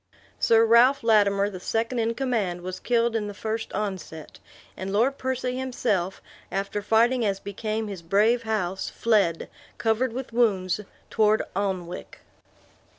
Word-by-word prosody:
Sir 225 0 +5
Ralph 240 +4 +5
Lattimer, 200 -3 +4
the 185 - -7
second 230 +5 -1
in 230 0 0
command, 220 -10 -1
was 185 +1 -6
killed 235 -1 +1
in 210 -2 -1
the 205 - -7
first 220 +2 -4
onset; 185 -7 -5 0.4
and 190 +1 -5
Lord 245 +7 +1
Percy 255 -1 -2
himself, 215 -8 -1 0.3
after 200 +1 -2
fighting 230 +4 +3
as 200 -2 0
became 215 +2 -4
his 195 -4 -6
brave 210 +8 +2
house, 210 -5 -2
fled, 200 -8 +1 0.3
covered 230 +2 +1
with 250 0 -6
wounds, 200 -6 +2 0.3
toward 215 0 +3
Alnwick. 185 -3 -4
215 Hz, 140 wpm, -25 LUFS, 195-235 Hz, 0.4 s, Sir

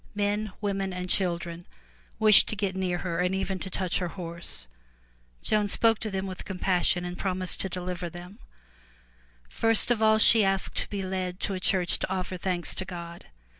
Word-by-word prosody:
Men, 205 0 -1
women 195 -2 -2
and 180 0 -4
children 175 -2 -1 0.5
wished 215 -2 +7
to - - -3
get 195 -2 -2
near 185 -2 -1
her 170 -2 -2
and 180 +1 +1
even 190 -1 -2
to 190 - -4
touch 185 -1 -1
her 180 - -2
horse. 170 - -7 0.8
Joan 210 -1 +1
spoke 225 +2 +3
to 220 - -3
them 195 -1 -3
with 185 -1 -7
compassion 180 -2 0
and 175 0 -5
promised 185 -1 -2
to 190 - -1
deliver 180 -1 -4
them. 175 +4 -11 1.1
First 225 - +4
of 230 -2 +1
all 220 0 +5
she 220 0 +7
asked 195 -1 +1
to - - 0
be 200 -2 -4
led 185 -1 -4
to 200 - -1
a 185 - -3
church 185 -1 +1
to - - -3
offer 185 0 -3
thanks 180 -1 -1
to - - -1
God. 170 -2 -9
185 Hz, 185 wpm, -27 LUFS, 180-200 Hz, 1.1 s, wished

